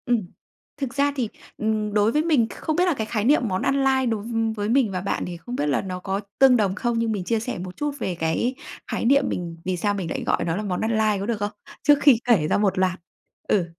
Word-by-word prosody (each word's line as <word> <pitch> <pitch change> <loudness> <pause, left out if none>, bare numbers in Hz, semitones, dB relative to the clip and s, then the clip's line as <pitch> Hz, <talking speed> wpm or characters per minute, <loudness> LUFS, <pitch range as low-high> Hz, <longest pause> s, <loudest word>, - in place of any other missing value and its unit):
Ừm, 240 -3 +2 0.6
thực 270 -3 -4
ra 280 +1 +2
thì, 245 -6 -1 0.3
ừm, 215 -1 -1
đối 210 +1 +3
với 300 - +2
mình 295 -9 +3
không 315 - -3
biết 355 +2 +3
là 355 - +2
cái 220 -6 -3
khái 215 -2 -1
niệm 290 +5 +4
món 185 0 -1
ăn 275 +1 +1
lai 265 -1 +2
đối 225 -3 -1
v - - -8 0.3
với 205 0 -2
mình 245 -3 +3
và 185 -1 -3
bạn 200 - -2
thì 175 -1 -6
không 245 +8 -7
biết 145 - -1
là 140 - +1
nó 185 -2 -5
có 195 +2 -2 0.2
tương 265 -2 +7
đồng 195 -4 +1
không. 235 +1 -1
Nhưng 230 -1 0
mình 200 -4 -2
chia 225 +4 0
sẻ 240 +3 -4
một 180 0 -7
chút 295 0 -1
về 180 - -2
cái 165 +11 -1 0.4
khái - - -2
niệm 280 +3 +5
mình 170 -2 -4
vì 185 -1 -1
sao 205 +4 0
mình 190 -5 -3
lại - - -3
gọi - - 0
nó 165 - -1
là 210 - -3
món 185 -3 -2
ăn 220 - 0
lai 215 -2 +2
có 195 - -3
được 230 0 -1
không, 205 0 -2 0.3
trước 290 -1 +5
khi 280 -5 +7
kể 210 -11 +3
ra - - +2
một 205 -2 +1
loạt? 185 0 +1 0.5
Ừ, 190 -5 +2
215 Hz, 275 wpm, -24 LUFS, 190-250 Hz, 0.6 s, tương